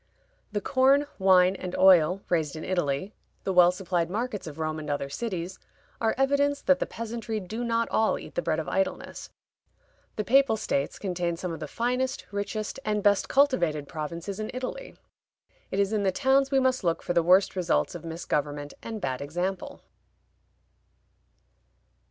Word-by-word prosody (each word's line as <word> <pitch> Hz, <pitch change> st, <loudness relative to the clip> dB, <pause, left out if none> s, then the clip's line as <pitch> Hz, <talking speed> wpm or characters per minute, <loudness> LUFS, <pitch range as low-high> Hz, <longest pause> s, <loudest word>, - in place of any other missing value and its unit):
The 205 Hz, -1 st, -2 dB
corn, 270 Hz, +5 st, +3 dB
wine, 185 Hz, -1 st, +5 dB
and 185 Hz, -1 st, -5 dB
oil 185 Hz, 0 st, +5 dB
raised 160 Hz, -4 st, 0 dB
in 155 Hz, -, -6 dB
Italy, 175 Hz, 0 st, -1 dB, 0.3 s
the 190 Hz, -, -1 dB
well 180 Hz, -1 st, +7 dB
supplied 180 Hz, -2 st, -1 dB
markets 210 Hz, -1 st, -3 dB
of 150 Hz, -1 st, -8 dB
Rome 155 Hz, 0 st, -2 dB
and 150 Hz, -1 st, -7 dB
other 140 Hz, -1 st, -2 dB
cities, 185 Hz, -3 st, -4 dB, 0.4 s
are 225 Hz, -1 st, +1 dB
evidence 280 Hz, +1 st, +2 dB
that 275 Hz, -1 st, +4 dB
the -, -, -1 dB
peasantry 230 Hz, -1 st, -4 dB
do 215 Hz, +5 st, -5 dB
not 230 Hz, -1 st, 0 dB
all 220 Hz, -, +2 dB
eat -, -, -10 dB
the -, -, -1 dB
bread 160 Hz, -2 st, 0 dB
of 160 Hz, -, -4 dB
idleness. 190 Hz, 0 st, -2 dB, 0.9 s
The 210 Hz, -, -1 dB
Papal 265 Hz, -1 st, +4 dB
States 140 Hz, -9 st, -2 dB
contain 175 Hz, -3 st, -2 dB
some 180 Hz, 0 st, -4 dB
of 160 Hz, -, -6 dB
the 155 Hz, -, -5 dB
finest, 250 Hz, -, -1 dB
richest, 205 Hz, +3 st, -4 dB
and 210 Hz, -4 st, -1 dB
best 205 Hz, -1 st, +3 dB
cultivated 175 Hz, -, +2 dB
provinces 170 Hz, +6 st, -5 dB
in 215 Hz, -, -3 dB
Italy. 260 Hz, -, -5 dB, 0.7 s
It 195 Hz, -, -2 dB
is 200 Hz, +1 st, +1 dB
in 215 Hz, -, +1 dB
the 195 Hz, -1 st, +2 dB
towns 270 Hz, +5 st, +2 dB
we 270 Hz, -1 st, +3 dB
must 260 Hz, -3 st, +1 dB
look 170 Hz, -2 st, 0 dB
for 175 Hz, -, -1 dB
the 170 Hz, -, +4 dB
worst 185 Hz, +4 st, +4 dB
results 120 Hz, -, 0 dB
of -, -, -8 dB
misgovernment 145 Hz, -3 st, -3 dB
and 220 Hz, -2 st, -6 dB
bad 130 Hz, -1 st, -2 dB
example. 185 Hz, -, -4 dB
190 Hz, 170 wpm, -27 LUFS, 170-230 Hz, 0.9 s, well